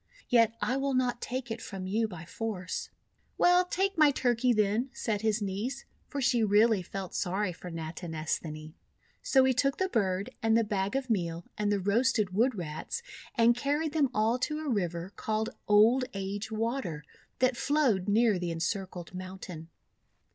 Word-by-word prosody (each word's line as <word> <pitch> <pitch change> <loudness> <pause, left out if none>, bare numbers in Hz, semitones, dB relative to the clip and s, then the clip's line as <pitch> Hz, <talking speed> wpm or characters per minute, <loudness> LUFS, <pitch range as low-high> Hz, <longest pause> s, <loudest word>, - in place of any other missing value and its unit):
Yet 230 -2 +4
I 255 - +1
will 275 -1 0
not 250 -1 0
take 250 -1 -4
it 225 0 -4
from 195 -2 -6
you 220 +4 +1
by 175 -5 -9
force." 185 -2 -4 0.5
"Well, 355 +1 +5
take 385 0 -1
my 305 -1 +7
Turkey, 250 -2 +2
then," 215 +3 +1
said 210 -3 -2
his 220 -1 +1
niece, 215 +7 -3 0.2
for 285 - -4
she 245 -3 +2
really 210 0 +4
felt 190 +1 -6
sorry 185 +1 -1
for 180 +2 -9
Natinesthani. 160 -1 -4 0.5
So 265 -1 +4
he 260 0 +4
took 275 +2 +1
the 375 0 0
bird 195 - 0
and 225 0 +3
the 230 - +3
bag 200 0 -1
of 265 -3 -1
meal 170 -4 -1
and 210 -1 0
the 205 - +2
roasted 215 +1 +2
Wood 235 +5 +2
Rats, 175 - -5 0.3
and 235 -1 +5
carried 290 +5 -1
them 295 -4 +3
all 225 +2 +1
to 300 +4 -1
a 310 - -3
river 175 -5 -2
called 220 0 -2 0.2
Old 225 +5 +5
Age 200 +2 -4
Water, 220 - -2 0.3
that 255 -1 +2
flowed 245 -9 +1
near 215 -2 +3
the 175 -1 -2
Encircled 175 +1 -3
Mountain. 185 -3 -8
215 Hz, 170 wpm, -30 LUFS, 185-255 Hz, 0.5 s, my